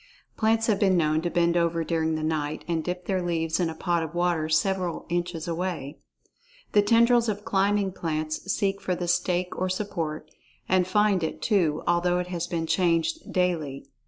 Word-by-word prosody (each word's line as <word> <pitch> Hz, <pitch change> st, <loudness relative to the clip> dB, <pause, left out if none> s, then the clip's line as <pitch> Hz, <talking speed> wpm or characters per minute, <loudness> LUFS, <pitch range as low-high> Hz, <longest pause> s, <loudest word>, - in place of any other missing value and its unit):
Plants 225 Hz, 0 st, +2 dB
have 215 Hz, -4 st, +1 dB
been 190 Hz, -3 st, +3 dB
known 155 Hz, -1 st, +2 dB
to 175 Hz, -, -1 dB
bend 170 Hz, 0 st, +2 dB
over 170 Hz, -1 st, +1 dB
during 160 Hz, -1 st, 0 dB
the 155 Hz, -, -3 dB
night 155 Hz, -1 st, -2 dB
and 165 Hz, -2 st, -1 dB
dip 180 Hz, +1 st, -4 dB
their 190 Hz, -2 st, 0 dB
leaves 165 Hz, -1 st, -1 dB
in 175 Hz, -2 st, +1 dB
a 160 Hz, -, -6 dB
pot 170 Hz, 0 st, 0 dB
of 165 Hz, +1 st, -5 dB
water 175 Hz, -3 st, +1 dB
several 180 Hz, +1 st, 0 dB
inches 175 Hz, -1 st, -2 dB
away. 170 Hz, -4 st, -3 dB, 0.7 s
The 205 Hz, -, +5 dB
tendrils 235 Hz, +2 st, +4 dB
of 205 Hz, 0 st, -4 dB
climbing 200 Hz, -1 st, +1 dB
plants 155 Hz, +1 st, -3 dB
seek 195 Hz, 0 st, 0 dB
for 185 Hz, -2 st, -1 dB
the 175 Hz, 0 st, -4 dB
stake 180 Hz, +1 st, 0 dB
or 185 Hz, 0 st, -1 dB
support, 170 Hz, -6 st, -3 dB, 0.4 s
and 185 Hz, -1 st, +2 dB
find 205 Hz, -2 st, +2 dB
it, 160 Hz, -, -3 dB
too, 170 Hz, -8 st, +1 dB
although 175 Hz, +1 st, +2 dB
it 180 Hz, 0 st, -3 dB
has 175 Hz, -1 st, -3 dB
been 165 Hz, -2 st, -2 dB
changed 175 Hz, -, 0 dB
daily. 160 Hz, -7 st, -1 dB
175 Hz, 185 wpm, -26 LUFS, 165-190 Hz, 0.7 s, The